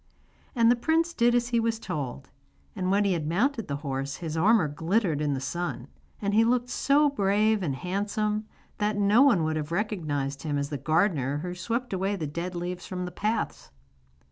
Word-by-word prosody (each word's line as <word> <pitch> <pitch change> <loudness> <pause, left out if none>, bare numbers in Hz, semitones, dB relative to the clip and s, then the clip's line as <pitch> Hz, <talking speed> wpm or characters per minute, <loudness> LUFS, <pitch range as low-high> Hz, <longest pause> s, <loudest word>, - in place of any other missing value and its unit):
And 230 -1 +5
the - - +4
prince 325 +7 +1
did 240 -4 +3
as 240 0 +1
he 235 -1 +2
was 225 0 0
told; 145 - -5 0.4
and 185 - -1
when 200 +2 +3
he 195 - +2
had 160 -3 -2
mounted 225 - 0
the 140 - -2
horse 135 0 -3
his 165 -1 -5
armour 195 +1 +4
glittered 165 +1 0
in 145 -2 0
the - - -3
sun, 140 -3 -4 0.3
and 200 -1 -1
he 220 +2 +5
looked 245 +1 +1
so 290 +2 +3
brave 210 -2 +2
and 145 -7 -1
handsome, 210 - -2 0.3
that 210 0 0
no 205 +4 +4
one 245 - +5
would 155 0 0
have 155 +1 -4
recognised 155 -8 -2
him 150 -2 -2
as 140 0 -2
the 145 - -3
gardener 155 -4 +1
who 180 0 -4
swept 230 +6 -3
away 195 +2 0
the 165 -5 -3
dead 170 +5 -4
leaves 175 +1 -4
from 180 -1 -4
the 180 - -6
paths. 215 +6 -2
185 Hz, 195 wpm, -27 LUFS, 155-220 Hz, 0.4 s, And